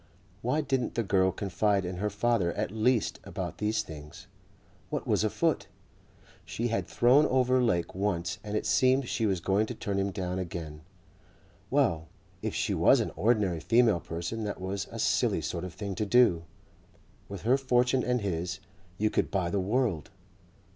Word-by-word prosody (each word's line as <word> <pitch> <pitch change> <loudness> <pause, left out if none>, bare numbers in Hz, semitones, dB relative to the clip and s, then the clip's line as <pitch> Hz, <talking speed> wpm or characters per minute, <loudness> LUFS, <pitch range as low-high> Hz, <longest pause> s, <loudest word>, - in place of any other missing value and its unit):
Why 130 +6 +1
didn't 135 -3 -1
the 115 - +1
girl 95 -2 +2
confide 100 +1 0
in 90 0 -4
her 105 +3 -1
father 105 -3 +1
at - - -2
least 110 +1 +1
about - - -6
these 105 +1 0
things? 75 -5 -11 0.6
What - - -3
was - - +1
afoot? - - 0 0.8
She 120 +1 -3
had 100 -6 -1
thrown 125 - +4
over 130 0 +2
Lake 90 -8 0
once 95 0 -2
and 105 0 -2
it - - -3
seemed 130 +6 +3
she 115 -2 0
was 95 -3 0
going 100 +5 +1
to 120 - -5
turn 100 -2 -2
him 100 0 0
down 95 -1 -3
again. 80 -4 -6 0.9
Well, 80 0 +1 0.3
if - - -3
she - - 0
was - - +5
an - - -1
ordinary 100 -2 +1
female 115 +1 +3
person 85 +8 -5
that 105 - -4
was 95 +1 -3
a - - -7
silly - - +1
sort 85 - -4
of 90 -2 -7
thing 100 -2 -4
to 105 +3 -2
do. 100 -8 +4 0.8
With 100 -3 -7
her 120 +4 +4
fortune 130 -1 +2
and 125 -1 0
his 90 -2 -3 0.4
you 105 +2 +1
could - - 0
buy 90 -3 -1
the 100 - 0
world. 100 - 0
100 Hz, 175 wpm, -29 LUFS, 90-120 Hz, 0.9 s, was